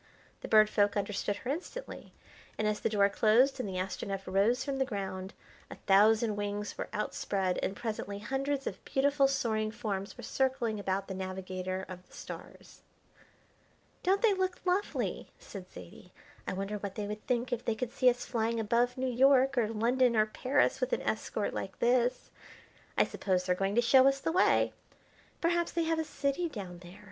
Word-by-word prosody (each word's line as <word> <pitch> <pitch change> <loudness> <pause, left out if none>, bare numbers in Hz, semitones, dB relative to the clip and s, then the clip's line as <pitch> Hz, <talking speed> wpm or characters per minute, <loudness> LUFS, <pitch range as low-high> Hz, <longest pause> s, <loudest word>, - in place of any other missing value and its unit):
The - - -7
Bird 215 -1 +6
Folk 205 -1 +2
understood 205 0 -1
her 245 +6 -4
instantly, 370 - -6 0.5
and 215 - 0
as 210 0 0
the - - 0
door 200 -2 +4
closed 230 +7 +3
and 215 - -2
the 185 - -4
Astronef 195 +1 -3
rose 200 +7 +2
from 275 -2 -2
the - - +4
ground, 190 -5 -5 0.3
a - - -8
thousand 215 +2 +4
wings 205 0 -3
were - - -5
outspread 195 -3 -1
and 195 - -2
presently 210 -2 -4
hundreds 270 +5 -2
of 190 - -5
beautiful 275 +1 +2
soaring 225 -5 0
forms 200 -3 -4
were - - -9
circling 255 -5 0
about 195 0 -2
the 190 - -5
Navigator 185 0 -4
of 180 -1 -9
the - - -22
Stars. - - -10 1.2
"Don't 390 +4 +2
they 440 -3 +5
look 375 -1 -1
lovely!" 370 +3 -1
said 185 -3 -10
Zaidie. 85 -1 -12 0.4
"I - - -1
wonder 195 +2 -3
what 200 -1 -5
they 210 - -3
would 210 +1 -6
think 245 0 0
if 240 - -3
they 230 - 0
could 245 +1 -3
see 255 0 +4
us 245 0 -2
flying 230 -1 -1
above 235 +3 +1
New 260 - -1
York 265 +2 +4
or 235 -4 +2
London 235 +3 +2
or 215 -1 +4
Paris 255 +6 +1
with - - 0
an - - 0
escort - - -2
like - - -5
this. 245 +1 +1 0.7
I - - +6
suppose 185 -2 -1
they're 180 - +2
going 195 +2 -1
to 240 - +5
show 260 +3 +6
us 275 0 +2
the 325 - -1
way. 370 +3 +3 0.7
Perhaps 340 0 +1
they 335 - +1
have 325 0 0
a - - +1
city 295 +3 -1
down 185 - -7
there. 180 +3 -13
220 Hz, 185 wpm, -31 LUFS, 200-265 Hz, 1.2 s, Bird